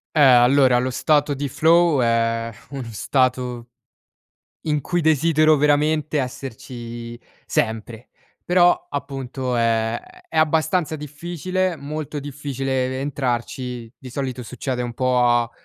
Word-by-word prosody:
Eh, - - +2
allora 130 -1 +6
lo 125 +1 -1
stato 145 +2 +1
di 140 +1 -3
flow 160 +1 +4
è 115 0 +1 0.2
uno 135 -2 -5
stato 125 +2 0 1.0
in 150 -2 +1
cui 175 +5 -1
desidero 155 0 +4
veramente 150 +1 +2
esserci 120 -2 -7 0.3
sempre. 110 +1 -2 0.3
Però, 175 0 +3
appunto, 135 -3 -4
è 115 0 +1 0.3
è 160 - -7
abbastanza 160 +1 +2
difficile 175 +5 -3
molto 150 +1 -5
difficile 135 -2 -2
e - - -3
ve 130 0 -4
entrarci, 125 -3 -3
di 130 - -10
solito 130 -1 -4
succede 125 +3 -4
un 120 -1 -5
po' 130 0 +1
a 120 -1 +3
135 Hz, 125 wpm, -22 LUFS, 120-150 Hz, 1.0 s, allora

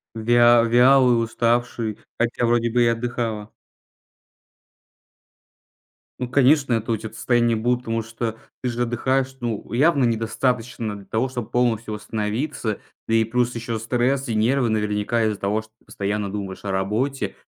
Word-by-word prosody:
Вя 120 +1 +5
вялый, 125 0 +5
уставший. 115 -1 -1 0.2
Хотя 120 +1 0
вроде 120 0 +2
бы 120 +1 +2
и 120 - +4
отдыхала. 115 -2 -2 2.7
Ну 125 - -3
конечно, 135 0 +3
это 115 +1 -1
у - - +1
тя 110 +1 -7
т - - -18
состояние 120 -1 +2
будет, 120 +2 0
потому 115 -2 -2
что 115 0 -4 0.3
ты 125 - -1
же 120 0 -2
отдыхаешь. 130 +3 0
Ну 115 -3 -4
явно 140 +2 +3
недостаточно 115 0 -1
для 100 -1 -13
того, 110 +6 -1
чтобы 120 -3 -6
полностью 115 -3 0
восстановиться. 110 +2 -3 0.3
Да 115 - +1
и 115 0 +4
плюс 120 +2 0
еще 115 -1 -3
стресс 125 +4 0
и 115 - -1
нервы, 120 +4 +2
наверняка 105 +1 0
из-за 105 -2 -1
того, 105 +2 0
что 110 - -21
ты - - -30
постоянно 100 0 -3
думаешь 100 -1 -6
о 100 - -3
работе. 105 +9 -1
115 Hz, 155 wpm, -22 LUFS, 110-125 Hz, 2.7 s, Вя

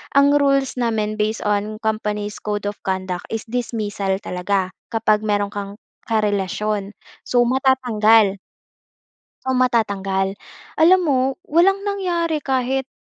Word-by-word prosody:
ang 280 0 +6
rules 275 -2 +2
namin 220 -3 0
based 215 +1 -1
on 210 +1 0
company's 210 -1 -2
code 210 -1 -3
of 205 0 -4
conduct 185 -1 -3
is 225 -1 -3
dismissal 215 -5 -2
talaga 185 +1 -1 0.2
kapag 220 -1 +2
meron 205 -1 0
kang 200 0 -5 0.3
karelasyon. 210 -1 -1 0.3
So 245 -1 +3
matatanggal. 225 -6 +3 1.1
So 260 - 0
matatanggal. 200 -6 +1 0.5
Alam 370 +3 +7
mo, 275 -4 +2 0.3
walang 390 +6 +3
nangyari 345 -6 -1
kahit 265 0 -1
215 Hz, 115 wpm, -21 LUFS, 205-260 Hz, 1.1 s, Alam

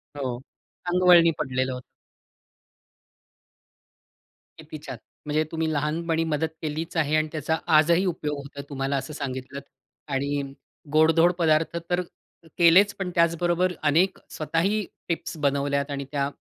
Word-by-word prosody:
हो. 130 -4 -3 0.5
अंगवळणी 175 -2 +6
पडलेलं 130 -2 -1
होतं. 125 - -7 2.8
किती - - -9
छान! - - -6 0.3
म्हणजे 150 +1 +1
तुम्ही 160 -1 -1
लहानपणी 160 +3 0
मदत 160 0 0
केलीच 160 +2 -4
आहे 155 -1 +2
आणि 155 0 +2
त्याचा 160 +1 -1 0.2
आजही 170 +4 +4
उपयोग 150 -4 -2
होतोय 140 0 -8
तुम्हाला 135 0 -1
असं 135 +3 -5
सांगितलत. 135 -1 -5 0.5
आणि 140 +1 -1 0.5
गोडधोड 165 +2 +5
पदार्थ 160 0 +2
तर 180 0 +1 0.6
केलेच, 180 +4 +6
पण 185 -2 -2
त्याचबरोबर 175 +2 +2
अनेक 165 +6 +3
स्वतःही 175 +7 0 0.2
टिप्स 165 -1 -3
बनवल्यात 140 0 0
आणि 140 -1 -4
त्या 140 -1 0
155 Hz, 120 wpm, -25 LUFS, 140-170 Hz, 2.8 s, अंगवळणी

